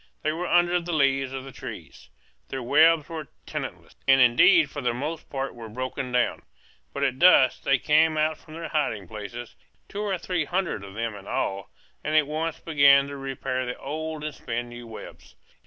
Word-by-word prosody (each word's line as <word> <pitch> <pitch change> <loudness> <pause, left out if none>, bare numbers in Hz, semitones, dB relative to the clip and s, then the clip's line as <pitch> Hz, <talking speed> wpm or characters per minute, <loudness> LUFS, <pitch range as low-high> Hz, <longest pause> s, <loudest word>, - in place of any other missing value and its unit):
They 155 - +1
were 170 +3 -3
under 175 0 +3
the 170 0 -4
leaves 135 -3 +2
of 135 -1 -5
the 135 - -10
trees. - - -10 0.4
Their 130 -1 -4
webs 155 +4 +4
were 160 -3 -6 0.2
tenantless, - - -6
and 135 0 +6
indeed 315 - +6
for 145 - -5
the 120 -2 0
most 150 +5 -5
part 135 -1 -3
were 115 -2 -9
broken 130 +2 -4
down. 125 0 +1 0.5
But 140 - -3
at 130 -2 0
dusk 155 -8 +6
they 135 - +3
came 155 +3 +3
out 155 +1 +1
from 155 - -13
their 165 0 -6
hiding 110 - -1
places, 110 +3 -8 0.3
two 205 - -5
or 200 -3 -1
three 175 -2 -2
hundred 175 - -2
of 100 0 -10
them 115 0 -2
in 100 -1 -11
all, 95 0 -2 0.3
and 155 +1 -1
at 155 -1 +5
once 160 +2 -3
began 140 -3 +5
to 140 - -6
repair 135 -1 -3
the 125 - -4
old 155 +1 -5
and 155 -1 -4
spin 120 0 -4
new 120 0 -10
webs. 115 - -11
140 Hz, 195 wpm, -25 LUFS, 125-160 Hz, 0.5 s, and